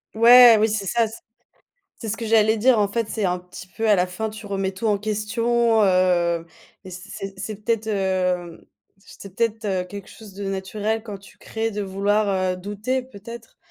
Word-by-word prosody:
Ouais, 235 +1 +8
oui, 220 +1 +3
c'est 210 -2 -2
ça. 230 +4 +1
C'est 220 +1 -11 0.8
c'est 225 - -5
ce 225 - -4
que 230 - -4
j'allais 220 0 +3
dire, 245 +1 +4
en 205 -1 +2
fait, 230 +1 -2
c'est 220 -2 -3
un 180 -1 0
petit 180 0 -12
peu 220 +5 -3
à 210 - +6
la 180 -2 +2
fin, 200 +5 -4
tu 215 0 -10
remets 195 -1 -2
tout 190 +4 -4
en 210 -2 +2
question, 225 +2 +1
heu 180 -3 +2 0.4
et 190 - -10
c'est 195 +2 -8
c'est 200 +3 -5
peut-être, 220 +1 -2
heu, 185 -4 -2 0.3
c'est 195 -1 -14
peut-être, 225 0 -1
heu, 190 -3 0
quelque 200 +1 -9
chose 215 -4 -13
de 200 +1 -6
naturel 205 +3 -3
quand 210 -3 -7
tu 195 0 -18
crées 225 0 -3
de 210 -1 -4
vouloir, 200 +2 0 0.2
heu, - - -5
douter 205 +7 -3
peut-être, 230 -1 -12
210 Hz, 195 wpm, -22 LUFS, 190-225 Hz, 0.8 s, Ouais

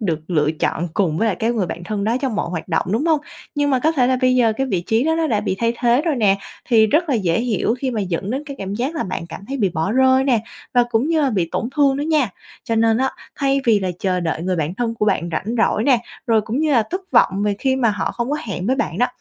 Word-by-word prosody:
được 165 -7 -1
lựa 150 -3 +2
chọn 160 +2 -2
cùng 175 -6 +1
với 225 - +2
lại 200 -5 0
cái 230 +2 0
người 205 -6 -1
bạn 175 - -6
thân 205 -1 -3
đó 230 +3 +1
trong 260 -6 -1
mọi 170 - -2
hoạt 175 0 -5
động, 165 +1 0
đúng 285 +9 0
hông? 315 -3 +3 0.3
Nhưng 290 0 +1
mà 260 - +3
có 315 +1 +3
thể 255 -5 +2
là 260 0 +2
bây 255 -1 +3
giờ 230 -3 +3
cái 270 - 0
vị 185 -8 -1
trí 225 +4 +2
đó 320 - +2
nó 325 0 +1
đã 215 -8 +1
bị 190 -3 -2
thay 230 0 +1
thế 245 +3 +3
rồi 320 -5 0
nè, 200 -4 +3 0.3
thì 220 -3 +4
rất 310 +8 +1
là 275 - +2
dễ 185 -3 +1
hiểu 230 -1 0
khi 265 -1 -2
mà 225 - -2
dẫn 190 +1 -3
đến 270 +4 -2
cái 280 -1 -7
cảm 195 +1 -4
giác 260 +8 -2
là 320 - -1
bạn 185 -2 -5
cảm 170 - -8
thấy 275 - -3
bị 205 -6 +1
bỏ 165 +4 -2
rơi 260 +1 +4
nè, 245 -5 +2 0.3
và 245 -1 +5
cũng 235 +6 +1
như 325 -1 +2
là 275 -3 +2
bị 180 -6 0
tổn 235 - -1
thương 275 -2 +4
đó 285 - -2
nha. 300 -6 +2 0.4
Cho 230 - -1
nên 225 0 +3
á, 265 0 +1 0.3
thay 275 -1 +1
vì 220 -4 +4
là 185 -1 -1
chờ 185 -2 0
đợi 165 -1 -2
người 185 0 -1
bạn 160 +3 -2
thân 230 +1 -2
của 210 - -1
bạn 175 -4 +1
rảnh 210 +9 -2
rỗi 225 0 +2
nè, 255 -4 +4 0.3
rồi 225 -3 +3
cũng 225 +5 -3
như 310 -2 +1
là 235 - +4
thất 370 - -2
vọng 195 +2 +3
về 210 -1 +1
khi 265 -1 +1
mà 235 -4 +2
họ 205 - -2
không 240 +3 -3
có 295 - 0
hẹn 190 -1 -4
với 260 - +1
bạn 170 - -2
đó, 245 - +4
230 Hz, 300 wpm, -20 LUFS, 195-265 Hz, 0.4 s, và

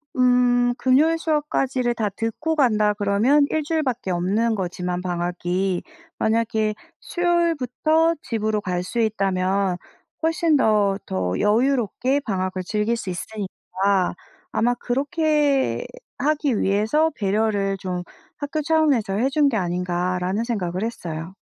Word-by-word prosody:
음 245 -1 +3
금요일 300 +6 +3
수업까지를 270 -6 0
다 220 -2 0
듣고 225 +10 -2
간다 215 -7 +3
그러면 210 +8 +3
1 315 - 0
주일밖에 275 - -1
없는 205 +6 +1
거지만 180 -1 -3
방학이. 180 +1 -1 0.4
만약에 220 -1 +1 0.3
수요일부터 330 - +1
집으로 215 -2 -1
갈 180 -1 -2
수 235 +6 -4
있다면 195 -3 +1 0.4
훨씬 325 -1 +2
더 210 -6 +3
더 90 -1 -2
여유롭게 250 +4 +1
방학을 185 -5 -2
즐길 210 +4 0
수 200 -5 -5
있으니까 190 -1 -2 0.4
'아마 240 +2 +2
그렇게 285 - +1 0.3
하기 290 -4 +1
위해서 220 +11 +2
배려를 200 -1 0
좀 180 -2 -4 0.3
학교 300 +1 -3
차원에서 295 -10 +2
해 235 +6 +2
준 285 0 +3
게 225 - -1
아닌가.'라는 180 +2 -1
생각을 190 -5 -2
했어요. 170 -6 -5
220 Hz, 270 characters per minute, -23 LUFS, 190-275 Hz, 0.4 s, 음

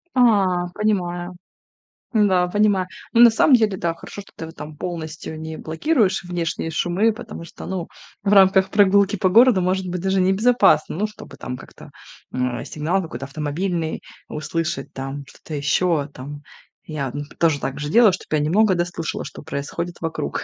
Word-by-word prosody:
А, 195 -8 +3
понимаю. 180 -4 -1 0.8
Да, 190 -5 +3
понимаю. 205 -2 +2 0.3
Ну, 235 - +5
на 240 - +10
самом 255 +4 +5
деле, 215 -5 +2
да, 170 -2 -1
хорошо, 170 +4 -9
что 200 - -19
ты 160 - -6
вот 160 +1 -11
там 150 0 -8
полностью 160 -1 -6
не 160 0 -6
блокируешь 195 - 0
внешние 170 -2 -3
шумы. 185 +7 +1
Потому 170 - -9
что, - - -10
ну, 185 -3 -4 0.4
в 200 0 +2
рамках 190 -1 +5
прогулки 200 0 +4
по 190 -1 +1
городу, 230 0 +6
может 185 +1 0
быть, 180 0 -3
даже 190 +1 +1
небезопасно. 190 -5 +3
Ну, 210 +3 0
чтобы 215 - -13
там 125 - -5
как-то, - - -13 0.4
а, 125 -2 -2
сигнал 165 +6 -1
какой-то 135 -6 -6
автомобильный 160 +4 -3 0.3
услышать 155 -2 -3
там, 135 +1 -5
что-то 155 - -12
еще 145 +1 +1
там. 145 +3 -8 0.4
Я, 140 -5 -4
м, 145 +1 -4 0.2
тоже 160 -4 +2
также 145 +2 -4
делаю, 225 +3 +6
чтоб 185 - -6
я 155 - +3
немного 185 +7 +3
да 175 - +1
слышала, 165 -3 -4
что - - -9
происходит 170 +5 -4
вокруг. 160 - -3
175 Hz, 165 wpm, -22 LUFS, 155-195 Hz, 0.8 s, на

